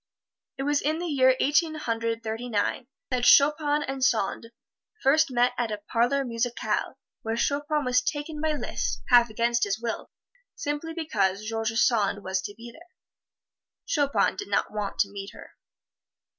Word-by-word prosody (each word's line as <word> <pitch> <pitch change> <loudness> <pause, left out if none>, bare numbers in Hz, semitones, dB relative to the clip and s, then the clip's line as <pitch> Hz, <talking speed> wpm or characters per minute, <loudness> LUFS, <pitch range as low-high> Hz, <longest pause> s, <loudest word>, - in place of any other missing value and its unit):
It 270 - -3
was 290 +1 +1
in 310 +2 0
the 350 - -4
year 260 -5 +4
Eighteen 310 +3 +2
Hundred 230 -5 -2
Thirty 225 +2 -4
nine, 230 +3 -1 0.2
that 250 -1 0
Chopin 295 +2 +5
and 270 -1 -4
Sand 230 -2 +1 0.6
first 310 +3 +4
met 245 -1 +2
at 235 -2 -1
a 210 - -2
parlor 240 +6 0
musicale, 235 0 -2 0.2
where 225 +1 -3
Chopin 290 +3 0
was 250 0 +3
taken 295 +3 -4
by 315 -1 +1
Liszt, 295 - -3
half 240 -1 +6
against 235 +2 +1
his 200 +1 0
will, 230 -1 -4 0.5
simply 295 +3 -4
because 210 - 0
George 225 0 -1
Sand 210 -3 +2
was 190 0 -1
to 205 +2 -7
be 235 +1 -10
there. 335 +7 -17 1.0
Chopin 285 -2 +1
did 405 - -5
not - - 0
want 210 -2 -3
to 200 - -1
meet 200 0 -7
her. - - -13
245 Hz, 160 wpm, -26 LUFS, 225-290 Hz, 1.0 s, half